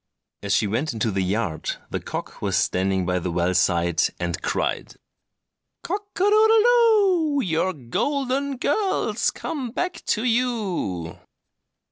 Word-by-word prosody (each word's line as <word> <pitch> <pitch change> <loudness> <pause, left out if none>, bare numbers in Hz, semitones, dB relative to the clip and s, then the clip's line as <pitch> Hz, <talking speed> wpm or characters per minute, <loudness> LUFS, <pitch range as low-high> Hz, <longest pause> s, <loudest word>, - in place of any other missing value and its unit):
And - - -6
as 100 - +1
she 110 - +2
went 120 +8 -1
into 110 0 -1
the 95 0 -1
yard 95 -3 -2 0.2
the - - -2
cock - - -7
was - - 0
standing 95 0 +1
by 90 +1 0
the 90 - -3
well 85 +1 0
side, 85 -1 +2 0.2
and 90 0 -3
cried— - - -2 0.9
"Cock 405 +3 -3
a - - -6
doodle 425 +2 +5 0.9
doo! - - +2
Your 170 +2 +1
golden 270 - -2
girl's 380 - 0
come 270 -6 -5
back 360 +10 -3
to 220 - +1
you!" 215 - -1
125 Hz, 140 wpm, -23 LUFS, -, 0.9 s, doodle